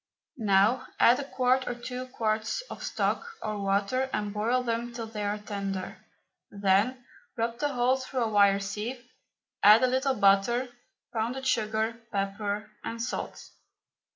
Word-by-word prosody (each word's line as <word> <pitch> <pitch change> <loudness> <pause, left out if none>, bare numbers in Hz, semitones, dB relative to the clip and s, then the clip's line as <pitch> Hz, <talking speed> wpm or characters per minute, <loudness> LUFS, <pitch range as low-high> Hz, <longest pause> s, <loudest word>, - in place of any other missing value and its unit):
Now 215 +5 +3
add 240 +3 +6
a - - -2
quart 260 -1 +1
or 245 - -2
two 250 +1 -6
quarts 220 - -1
of - - -7
stock 470 -1 -2
or 215 -1 -3
water 200 +7 +1
and 210 -1 -2
boil 235 +4 +1
them 235 0 -2
till 235 -1 -5
they 220 -2 -5
are 205 +1 -1
tender. 200 -2 -4 0.5
Then 205 +6 +1 0.3
rub 230 +1 -1
the 290 - +1
whole 250 +1 +3
through 260 -1 -2
a 225 - 0
wire 200 -2 +5
sieve, 215 +5 -5 0.5
add 215 +4 +8
a - - +5
little 260 +1 +1
butter, 205 +5 +3 0.4
pounded 240 +4 -2
sugar, 220 -1 0
pepper, 205 +1 -2
and 230 - -5
salt. 235 +2 -4
230 Hz, 150 wpm, -28 LUFS, 205-250 Hz, 0.5 s, add